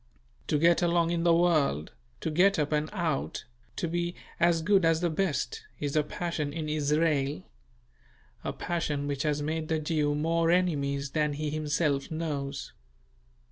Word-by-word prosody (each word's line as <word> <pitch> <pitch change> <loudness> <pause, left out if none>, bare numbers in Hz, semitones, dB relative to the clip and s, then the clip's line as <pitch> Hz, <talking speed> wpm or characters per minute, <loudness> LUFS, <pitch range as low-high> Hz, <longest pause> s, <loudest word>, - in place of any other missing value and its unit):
To 150 - +2
get 170 +3 +4
along 170 -1 +2
in 170 -1 0
the 170 -1 +5
world, 155 - +2 0.3
to 160 - -2
get 190 +5 +4
up 150 -1 0
and 150 0 0
out, 170 -8 -2 0.3
to 170 - -2
be 175 +1 -2 0.2
"as 170 -1 +3
good 195 +1 +4
as 165 -1 +3
the 175 -2 +1
best," 190 - -1 0.2
is 145 0 -2
a 155 - +5
passion 155 -1 -3
in 155 0 -4
Israel; 150 - +1 1.0
a - - -2
passion 150 -4 -2
which 140 -1 -2
has 150 -1 0
made 155 +1 -2
the 160 - +1
Jew 150 -1 0
more 165 +2 +1
enemies 140 -6 +1
than 150 -1 +1
he 150 +1 -3
himself 150 -2 0
knows. 145 -4 -4
155 Hz, 160 wpm, -29 LUFS, 145-170 Hz, 1.0 s, the